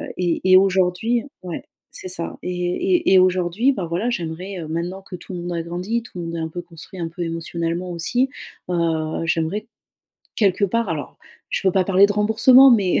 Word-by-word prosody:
et 175 -2 0
et - - +10
aujourd'hui 190 +5 +2 0.2
ouais 180 -2 -5 0.3
c'est - - -5
ça 175 -2 -4
et - - -4
et 315 - +1
et 190 - +8
aujourd'hui, 185 +7 +2
bah 190 -8 -3
voilà, 175 +8 -1
j'aimerais, 180 -1 -4
heu, 160 - -6
maintenant 175 +4 -3
que 190 -1 -9
tout 180 - -10
le 180 - -4
monde 175 +1 -5
a 170 - -2
grandi, 180 +8 -3
tout 230 - -12
le - - -4
monde 165 0 -5
est - - -3
un 160 - -2
peu 175 +2 -6
construit 175 +2 -12
un 165 - -2
peu 170 +2 -8
émotionnellement 170 +1 -3
aussi, 245 +10 0 0.4
bah, 165 -3 -1
j'aimerais 165 +7 -1 0.7
quelque 200 -2 +2
part, 230 +3 0
alors, 150 -3 -5 0.3
je - - -1
ne - - +6
peux - - -8
pas 190 -1 +3
parler 195 +1 +5
de 205 - -1
remboursement, 225 +6 +6
mais, 200 -6 +3
180 Hz, 210 wpm, -21 LUFS, 170-205 Hz, 0.7 s, et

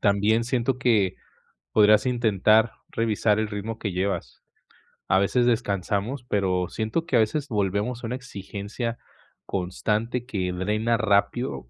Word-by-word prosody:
También 105 +3 +2
siento 125 +1 0
que 105 -7 +2 0.5
podrías 110 +2 +5
intentar 110 -2 +3 0.2
revisar 110 -2 +1
el 110 -1 0
ritmo 105 +2 -5
que 100 -4 -3
llevas. 95 +2 -3 0.7
A 95 - +3
veces 120 +5 +2
descansamos, 110 +2 -1
pero 95 -4 0
siento 110 +10 -2
que 140 - -1
a 120 - +6
veces 140 +7 0
volvemos 105 +2 -1
a 115 - -3
una 125 - -3
exigencia 115 -1 -5 0.5
constante 105 +6 -2
que 95 -8 -2
drena 105 +6 0
rápido 100 - 0
110 Hz, 135 wpm, -25 LUFS, 100-120 Hz, 0.7 s, a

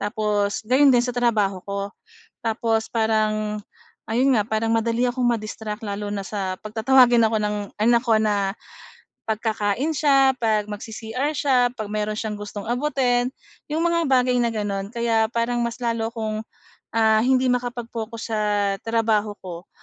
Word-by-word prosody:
tapos 210 -1 -1
gayon 265 +5 +5
din 245 -2 +4
sa 245 - -2
trabaho 215 -6 +1
ko. 200 0 -3 0.5
Tapos 225 0 0
parang 215 -2 0 0.4
ayun 250 +4 +3
nga, 210 - +3
parang 220 +1 -1
madali 230 +2 +1
akong 250 +1 -2
ma-distract 215 -2 -3
lalo 205 0 -4
na 200 -2 -4
sa 190 -2 -3
‘pag 215 +1 -10
tatawagin 240 0 +5
ako 220 0 +2
ng 210 0 -1 0.2
anak 235 +2 +3
ko 225 -3 +3
na, 205 -2 +1 0.8
‘pag 220 0 -1
kakain 220 +7 0
siya, 270 -2 +4
‘pag 215 -3 0
mag-C-CR 225 +6 -4
siya, 255 -5 +2
‘pag 215 -4 -6
meron 210 0 -2
siyang 215 -2 -3
gustong 205 0 -7
abutin, 250 -1 +1 0.4
‘yong 315 - 0
mga 340 0 +2
bagay 250 -1 +3
na 235 -1 +1
gano’n. 205 -1 -3
Kaya 230 -2 +1
parang 240 0 0
mas 235 +1 -4
lalo 230 -1 -1
akong, 220 -2 -3 0.5
ah, 220 -1 +4
hindi 255 +2 +3
makapag-focus 235 -2 -4
sa 215 - 0 0.4
trabaho 220 -2 0
ko. 175 0 -8
225 Hz, 155 wpm, -23 LUFS, 210-245 Hz, 0.8 s, gayon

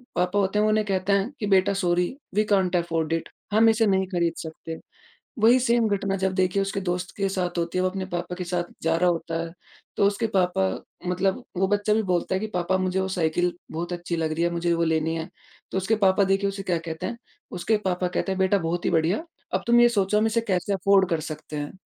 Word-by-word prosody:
पापा 180 +3 +1
होते 195 +2 +1
हैं - - +3
वो - - +3
उन्हें 215 0 +2
कहते 195 +1 +1
हैं 200 +6 +1
कि 210 - -2
बेटा 195 +1 +3
sorry 175 +6 +1 0.2
we 215 - +4
can't 185 -2 +2
afford 165 -2 -1
it. 165 - -2 0.2
हम 225 +1 +6
इसे 225 0 +3
नहीं 190 -1 +2
खरीद 170 -1 +1
सकते। 160 0 -7 0.6
वही 240 +3 +7
सेम 235 -2 +2
घटना 195 0 -2
जब 190 0 0
देखिए 185 +1 +1
उसके 195 0 -2
दोस्त 180 0 -2
के 195 -1 0
साथ 180 -2 -2
होती 170 +2 -1
है - - +2
वो 185 - +2
अपने 190 0 -4
पापा 175 0 -4
के 180 - -3
साथ 175 0 -1 0.2
जा 165 0 +2
रहा 180 +1 +3
होता 165 -1 -3
है, 165 0 -7 0.4
तो 200 - +4
उसके 205 +3 +1
पापा 180 - +2 0.4
मतलब 190 +7 0 0.2
वो 190 0 +2
बच्चा 205 +1 +1
भी 220 - +2
बोलता 175 +1 0
है 190 - 0
कि 220 - -2
पापा 180 +1 +1
मुझे 185 0 0
वो 190 - -1
साइकिल 175 0 0 0.2
बहुत 170 +3 -4
अच्छी 175 -1 -3
लग 160 -1 -1
रही 165 +2 -1
है 170 - +2
मुझे 170 0 0
वो 170 0 +1
लेनी 160 0 0
है। 160 +2 -4 0.4
तो - - 0
उसके 190 +4 +1
पापा 195 -1 +4
देखिए 195 +1 +1
उसे 195 0 -4
क्या 180 -3 0
कहते 160 -1 -5
हैं 235 - -4 0.4
उसके 180 +5 +1
पापा 180 -1 0
कहते 190 +2 -1
हैं, 190 - -3
"बेटा 190 +1 +3
बहुत 170 +1 -2
ही - - +2
बढ़िया। 170 - +1 0.3
अब - - +1
तुम 240 0 +6
यह 240 - +7
सोचो 210 -2 +1
हम 220 - +2
इसे 230 +1 +1
कैसे 185 +2 0
अफ़ॉर्ड 195 0 +3
कर 165 -2 +1
सकते 150 0 -7
हैं?" 145 0 -4
185 Hz, 245 wpm, -25 LUFS, 170-200 Hz, 0.6 s, वही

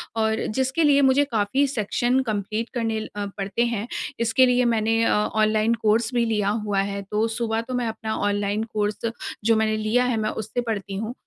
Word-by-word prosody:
और 220 0 0
जिसके 265 +5 +1
लिए 285 -2 +5
मुझे 270 +1 +4
काफ़ी 220 +6 +2
सेक्शन 245 +1 0
कम्प्लीट 215 +3 -3
करने 225 -2 -1 0.2
अ, 205 0 -3
पड़ते 200 +4 0
हैं। 230 -1 -2 0.3
इसके 235 +3 +4
लिए 250 0 +3
मैंने 225 +1 +1
अ, - - +3
ऑनलाइन 215 +1 +2
कोर्स 220 +3 +2
भी 240 -1 +2
लिया 210 -3 0 0.2
हुआ 200 -2 0
है। 200 - -4
तो 215 +2 +1
सुबह 225 -1 -1
तो 255 +2 -7
मैं 245 -2 -1
अपना 220 0 -4
ऑनलाइन 205 +1 0
कोर्स 210 0 -1 0.5
जो 225 0 +4
मैंने 220 0 +1
लिया 215 +3 +1
है, 245 -3 0
मैं 215 0 0
उससे 220 +3 -3
पढ़ती 200 -4 -4
हूँ। 220 +3 -4
220 Hz, 190 wpm, -24 LUFS, 210-240 Hz, 0.5 s, लिए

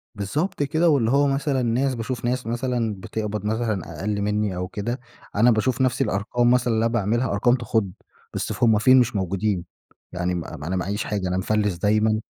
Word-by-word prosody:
بالضبط 145 - -2
كده، 160 +4 +2
واللي 120 -6 +2
هو 140 +1 +4
مثلًا 135 -1 0
ناس 125 +3 +1
باشوف 120 +2 -4
ناس 125 0 -1
مثلًا 120 -2 -1
بتقبَض 105 -1 -4
مثلًا 105 -8 -2
أقَلّ 100 +1 -1
مني 105 -2 0
أو 90 0 -3
كده، 120 +7 -4 0.4
أنا 120 +4 +5
باشوف 120 +4 +1
نفس 130 -1 +1
الأرقَام 120 +5 +1
مثلًا 125 -2 +2
اللي 110 +1 +1
أنا 115 - 0
باعملها، 115 +3 0
أرقَام 120 +5 +3
تخُض، 110 -5 -1 0.4
بس - - -2
ف 125 - -4
هُم 110 -2 +5
فين؟ 130 +4 +6
مش 120 -2 +1
موجُودين. 95 -1 -1 0.5
يعني 90 0 -2
م - - -1
م 75 -3 -8
أنا 90 +4 -2
معاييش 95 +4 -2
حاجة، 100 -3 -2
أنا 90 0 -1
مفلِس 105 0 0
دايمًا. 110 +3 +2
110 Hz, 195 wpm, -23 LUFS, 100-125 Hz, 0.5 s, فين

